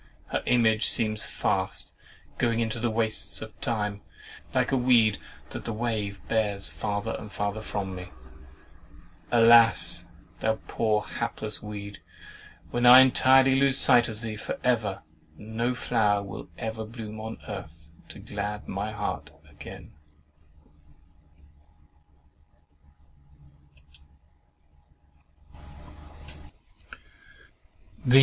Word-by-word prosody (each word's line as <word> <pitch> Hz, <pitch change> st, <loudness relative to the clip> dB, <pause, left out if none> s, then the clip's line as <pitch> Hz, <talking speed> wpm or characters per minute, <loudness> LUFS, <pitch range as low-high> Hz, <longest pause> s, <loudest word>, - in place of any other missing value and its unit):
Her -, -, -1 dB
image 110 Hz, -3 st, +3 dB
seems 110 Hz, -1 st, +1 dB
fast -, -, -2 dB, 0.5 s
"going 115 Hz, -1 st, +1 dB
into 115 Hz, 0 st, -2 dB
the 120 Hz, +1 st, 0 dB
wastes 110 Hz, -1 st, -1 dB
of 110 Hz, 0 st, -11 dB
time," 105 Hz, -3 st, -2 dB, 0.5 s
like -, -, +1 dB
a -, -, +2 dB
weed 120 Hz, -4 st, +3 dB, 0.3 s
that -, -, -6 dB
the 115 Hz, -, -4 dB
wave 105 Hz, -3 st, -3 dB
bears 105 Hz, -3 st, -1 dB
farther 105 Hz, +1 st, -3 dB
and 105 Hz, -, -10 dB
farther 105 Hz, +1 st, -3 dB
from 100 Hz, -3 st, -4 dB
me. 90 Hz, -1 st, -8 dB, 1.2 s
Alas! 115 Hz, -6 st, +6 dB, 0.3 s
thou 110 Hz, 0 st, 0 dB
poor 110 Hz, -2 st, 0 dB
hapless 110 Hz, -2 st, -5 dB
weed, 100 Hz, -1 st, -8 dB, 0.7 s
when 120 Hz, -, -1 dB
I 125 Hz, +1 st, +11 dB
entirely 130 Hz, 0 st, +5 dB
lose 135 Hz, 0 st, +4 dB
sight 120 Hz, -1 st, +5 dB
of 110 Hz, 0 st, -8 dB
thee, 115 Hz, -1 st, -4 dB
and 105 Hz, -, -7 dB
for -, -, -4 dB
ever, 110 Hz, -8 st, 0 dB, 0.3 s
no 115 Hz, +3 st, -2 dB
flower 105 Hz, -3 st, +1 dB
will 100 Hz, -2 st, -9 dB
ever 110 Hz, 0 st, -4 dB
bloom 110 Hz, -1 st, -8 dB
on 110 Hz, +1 st, -6 dB
earth 80 Hz, 0 st, -9 dB, 0.2 s
to -, -, -9 dB
glad 105 Hz, 0 st, -5 dB
my 100 Hz, +3 st, -3 dB
heart 75 Hz, -, -4 dB, 0.2 s
again! 75 Hz, -, -12 dB
110 Hz, 105 wpm, -27 LUFS, 105-115 Hz, 1.2 s, I